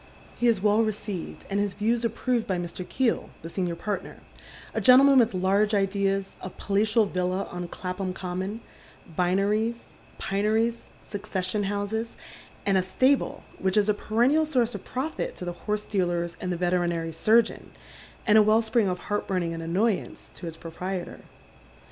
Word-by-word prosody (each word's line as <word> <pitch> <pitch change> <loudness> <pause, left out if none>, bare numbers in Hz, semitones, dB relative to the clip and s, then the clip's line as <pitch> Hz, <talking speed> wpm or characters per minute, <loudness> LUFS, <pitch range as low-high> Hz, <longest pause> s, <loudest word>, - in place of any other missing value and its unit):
He 245 - +1
is 220 -5 +2
well 210 +1 +4
received, 210 -4 -4
and 200 0 -1
his 205 -2 -1
views 230 +3 +1
approved 235 0 0
by 185 - 0
Mr. 175 +1 -5
Keel, 245 +5 0
the 165 - -7
senior 180 -2 -1
partner 205 +4 -4 0.3
— - - -17
a - - -1
gen 255 0 +8
tleman 275 -1 +7
with 230 -5 +3
large 200 +3 +2
ideas, 195 0 0
a 185 - -5
palatial 210 +4 +1
villa 185 0 -1
on 175 0 -4
Clapham 185 +2 -4
Common, 185 +4 -4 0.5
vineries, 205 +6 0 0.2
pineries, 220 +4 0 0.2
succession 200 -1 -2
houses, 205 +3 -2 0.5
and 195 -1 +3
a - - +3
stable 265 +9 +1 0.2
which 190 +1 +1
is 210 0 +4
a - - +5
perennial 240 +9 +2
source 245 -5 +1
of - - -6
profit 275 +5 -3
to 180 - -6
the 175 - -3 0.2
horse 210 0 0
dealers 175 -4 -1
and 180 - -2
the 175 - -1
veterinary 175 -2 0
surgeon, 220 +8 +2 0.6
and 215 -1 +6
a - - +8
well 215 +2 +4
spring 220 -1 +2
of 180 - -1
heart 205 +3 -3
burning 175 -3 -1
and 165 - -5
annoyance 190 +6 -1
to 175 - -8
its 165 -1 -7
I)roprietor. 180 +2 -5
200 Hz, 165 wpm, -26 LUFS, 180-220 Hz, 0.6 s, gen